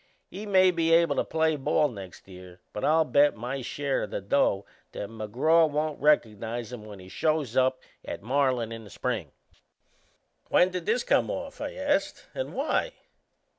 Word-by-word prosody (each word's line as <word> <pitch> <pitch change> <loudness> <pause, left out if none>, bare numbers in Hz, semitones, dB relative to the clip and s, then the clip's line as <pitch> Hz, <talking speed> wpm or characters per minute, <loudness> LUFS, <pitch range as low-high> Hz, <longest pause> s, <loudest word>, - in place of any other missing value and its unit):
He 205 +3 -7
may 185 -2 +5
be 165 -2 0
able 165 -3 +4
to - - +2
play 160 -1 +1
ball 150 +2 +2
next 100 -9 -10
year; 90 -1 -12
but 105 - -5
I'll 160 +1 +4
bet 145 0 +4
my 125 +4 -4
share 140 +2 -2
o' - - -3
the - - -4
dough 100 -1 +1 0.3
that 100 - -5
McGraw 130 +10 +2
won't 150 0 -2
reco'nize 115 -4 +1
him 110 -3 -8
when 105 -2 -10
he 95 -1 -13
shows 145 +5 -1
up 130 0 +2 0.2
at - - -7
Marlin 130 -2 +1
in 115 0 -7
the 105 - -13
spring." - - -3 1.2
"When 180 +1 +4
did 180 -2 -5
this 235 +3 +2
come - - +2
off?" 280 0 -5
I 290 - -4
asked. 290 +1 -1
"And - - -4
why?" - - 0
140 Hz, 175 wpm, -27 LUFS, 110-165 Hz, 1.2 s, may